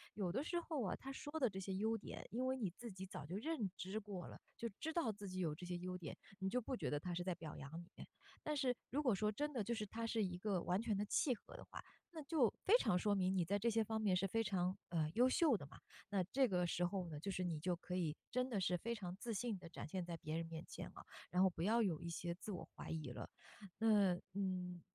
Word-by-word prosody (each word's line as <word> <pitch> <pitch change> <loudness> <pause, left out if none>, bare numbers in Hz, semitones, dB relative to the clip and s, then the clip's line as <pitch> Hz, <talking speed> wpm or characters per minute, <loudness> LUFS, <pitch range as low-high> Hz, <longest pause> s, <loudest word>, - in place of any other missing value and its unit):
有 195 -4 0
的 235 +11 0
时 345 +2 0
候 315 -6 -1
啊， 190 - 0
他 270 - -7
说 290 +3 -4
的 255 -5 +4
这 190 - -7
些 190 0 -2
优 220 +3 +2
点， 210 - -7
因 250 +3 0
为 260 0 +1
你 215 -7 0
自 235 -2 -6
己 190 0 -6
早 180 -6 -6
就 180 +6 -3
认 235 - -1
知 190 +3 -3
过 200 -4 -4
了， - - -8 0.2
就 235 - -1
知 320 - 0
道 325 -7 +2
自 205 -2 -4
己 185 0 -3
有 160 -5 +1
这 180 +3 -7
些 175 0 -2
优 180 +1 -3
点， 165 -5 -6 0.2
你 190 0 +1
就 250 - +2
不 255 +2 -2
觉 - - -1
得 145 - +1
他 175 +3 -3
是 175 +1 -1
在 185 0 0
表 160 -3 -6
扬 135 +1 -7
你。 175 - -13 0.5
但 300 -1 -1
是 255 -2 +3
如 295 +3 +1
果 250 -5 +5
说 210 +2 +2
真 295 +7 -1
的 235 -5 +1
就 235 +4 0
是 215 -1 -1
他 230 +3 -3
是 225 -1 +2
一 180 -2 -1
个 190 -2 0
完 180 +4 +2
全 225 -3 +1
地 205 - +1
契 255 +4 +3
合 - - -13
的 - - -7
话， - - -8 0.3
那 320 -3 -6
就 275 -6 +4
非 420 - +8
常 180 - +4
说 205 +3 +3
明 190 -1 +3
你 180 -3 +3
在 200 +4 +2
这 235 - +3
些 225 0 +3
方 220 0 -1
面 200 -4 +4
是 190 +2 +3
非 225 +4 +2
常， 185 -3 +1
呃， 160 -3 +2
优 250 +3 +6
秀 295 -1 +5
的 190 - -3
嘛。 - - -13 0.3
那 195 -2 +2
这 260 +9 +3
个 180 -4 +2
时 175 +1 +2
候 185 0 -1
呢， 150 -2 -5
就 195 - -3
是 185 -1 0
你 170 -4 0
就 180 +3 +1
可 180 +1 -4
以 160 -4 0
真 250 +1 +1
的 220 -5 +1
是 180 -1 +3
非 235 +6 -2
常 180 -5 -4
自 235 +3 -3
信 215 -1 -1
地 170 -2 -9
展 - - -6
现 185 +3 -2
在 170 -1 -4
别 155 -1 -3
人 165 - -1
面 165 0 -5
前 - - -5
了， - - -11 0.2
然 180 +1 +4
后 - - +8
不 165 - -5
要 225 +6 +4
有 170 -7 +1
一 170 - -3
些 170 +1 -2
自 200 +4 -6
我 185 - -4
怀 - - -6
疑 155 -6 -2
了。 - - -6 0.5
那， 205 -5 +5 0.2
嗯 180 -2 -1
195 Hz, 305 characters per minute, -41 LUFS, 180-230 Hz, 0.5 s, 非